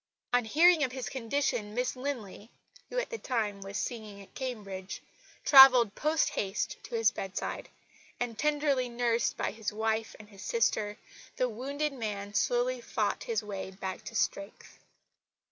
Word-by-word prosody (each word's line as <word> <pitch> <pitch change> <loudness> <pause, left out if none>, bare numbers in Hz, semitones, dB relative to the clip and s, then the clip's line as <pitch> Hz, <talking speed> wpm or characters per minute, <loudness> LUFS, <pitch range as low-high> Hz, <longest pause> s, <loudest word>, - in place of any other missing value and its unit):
On 245 -1 +3
hearing 320 +6 +5
of 255 -2 -1
his 260 -2 -4
condition 245 -4 -1
Miss 250 +1 -1
Linley 240 -6 -5 0.4
(who - - -5
at - - -1
the 460 - -4
time 215 -6 -2
was 195 +1 -5
singing 215 -4 -5
at 195 - -14
Cambridge) 205 -7 -5 0.5
travelled 255 -6 +9
post 305 +5 +1
haste 195 0 -2
to 240 - -6
his 225 -1 +4
bedside; 195 -4 -5 0.5
and, 245 -2 -2
tenderly 285 -2 +1
nursed 235 -1 0
by - - -1
his 220 -1 -4
wife 220 +1 -1
and 210 -1 -13
his 200 -3 -13
sister, 210 -1 0 0.4
the 255 - +1
wounded 280 +6 -3
man 205 -5 -4
slowly 245 +4 +1
fought 225 -3 -1
his 225 -2 -1
way 200 -2 -5
back 190 0 -6
to 230 - -8
strength. 200 -1 -3
230 Hz, 155 wpm, -30 LUFS, 210-260 Hz, 0.5 s, travelled